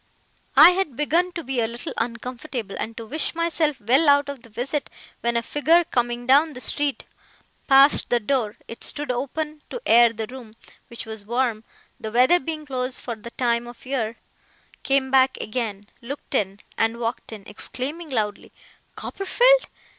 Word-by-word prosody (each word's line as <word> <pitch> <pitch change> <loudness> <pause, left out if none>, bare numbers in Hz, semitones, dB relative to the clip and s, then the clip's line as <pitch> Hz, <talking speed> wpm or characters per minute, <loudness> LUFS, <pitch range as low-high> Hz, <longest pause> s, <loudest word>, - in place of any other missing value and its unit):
I 310 +6 +10
had 360 -8 -2
begun 335 +6 +1
to 335 - -5
be 265 -2 -2
a 225 - +1
little 235 +1 -6
uncomfortable, 235 -1 -4
and 225 0 -5
to 230 - -6
wish 305 +8 -2
myself 325 -4 0
well 260 +9 +3
out 285 0 +4
of 280 -3 -6
the 230 - -16
visit, 270 +6 -3 0.3
when 235 0 0
a 235 - -1
figure 320 +7 +3
coming 240 -4 -1
down 290 +5 +4
the 250 - -8
street 285 +2 -1 0.6
passed 275 +1 +6
the 240 - +3
door 230 -2 -1
it 230 - -9
stood 295 -3 +2
open 300 +4 -4
to - - -5
air 235 0 +6
the 225 -1 -4
room, 235 -2 -11 0.3
which 235 - -7
was 220 -2 -6
warm, 235 0 -1 0.4
the 220 - -5
weather 255 +10 +5
being 310 +1 -5
close 255 -2 -3
for 235 - -5
the 225 +2 -10
time 235 -1 0
of 240 +2 -12
year 235 -4 -2 0.6
came 270 -1 +1
back 265 0 +4
again, 215 -3 -3 0.2
looked 280 +5 -8
in, 200 -5 -1 0.2
and 225 +1 +1
walked 235 0 -4
in, 210 -3 -9
exclaiming 285 +10 -5
loudly, 215 -5 -2 0.4
'Copperfield! - - +2
250 Hz, 170 wpm, -23 LUFS, 230-290 Hz, 0.6 s, I